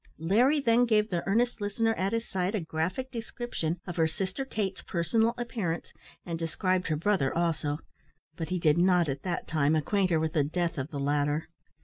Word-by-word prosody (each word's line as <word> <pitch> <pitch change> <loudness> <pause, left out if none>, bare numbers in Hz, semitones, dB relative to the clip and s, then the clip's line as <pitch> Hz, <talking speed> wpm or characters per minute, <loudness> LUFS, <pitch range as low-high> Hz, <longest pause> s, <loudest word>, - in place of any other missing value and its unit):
Larry 235 - +3
then 245 -2 +4
gave 215 -2 +2
the 175 -2 0
earnest 235 +3 +1
listener 225 +2 +1
at 195 -2 -1
his 230 0 -1
side 190 +2 -1
a - - +1
graphic 180 +10 -3
description 225 -8 -3
of 175 -2 -6
her 160 -1 +4
sister 190 - -3
Kate's 205 -7 -3
personal 225 +7 +1
appearance, 215 -9 -3 0.3
and 170 -2 -4
described 180 +3 0
her 155 - +1
brother 165 -4 +1
also, 160 -4 0 0.6
but 165 -1 -4
he 185 - 0
did 165 -1 +3
not, 180 -2 +4
at 135 -1 -3
that 180 -2 -3
time, 155 -1 +2
acquaint 185 +5 +1
her 165 -2 +3
with 160 0 -1
the 155 -4 +3
death 170 +1 -1
of 130 +3 -3
the 145 - -5
latter. 145 +2 0
180 Hz, 195 wpm, -29 LUFS, 160-215 Hz, 0.6 s, then